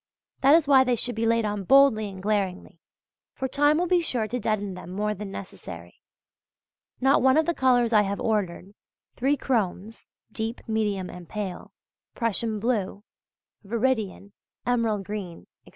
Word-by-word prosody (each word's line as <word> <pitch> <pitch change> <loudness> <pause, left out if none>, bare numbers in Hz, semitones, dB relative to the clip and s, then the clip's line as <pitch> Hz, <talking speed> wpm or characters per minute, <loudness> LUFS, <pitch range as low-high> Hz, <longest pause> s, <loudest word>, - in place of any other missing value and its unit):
That 275 +3 +6
is 325 -3 +3
why 270 -2 +6
they 250 -1 +1
should 245 +2 -2
be 225 +1 -1
laid 230 -1 +2
on 205 -1 -2
boldly 250 -2 +5
and 190 -1 -10
glaringly; 200 -3 -2 0.6
for 265 - -2
time 290 +3 +3
will 355 - +1
be 360 0 +3
sure 240 -9 -1
to 245 +4 -3
deaden 205 -4 -1
them 180 -1 -9
more 210 +3 -1
than 210 0 -7
necessary. 180 - -9 1.0
Not 270 +2 +4
one 265 +2 +4
of 315 - +3
the 340 - +1
colours 245 -5 +2
I 210 - +6
have 200 0 -2
ordered: 200 -3 -2 0.4
three 275 +3 +1
chromes 220 -4 -2 0.2
(deep, 225 +3 -5
medium 210 -4 -1
and 180 -1 -11
pale), 200 -4 -5 0.4
Prussian 230 -1 -1
blue, 205 -3 -1 0.6
veridian, 220 -3 -1 0.3
emerald 230 -4 0
green 195 -5 -6 0.2
etc. - - -13
220 Hz, 160 wpm, -26 LUFS, 200-250 Hz, 1.0 s, That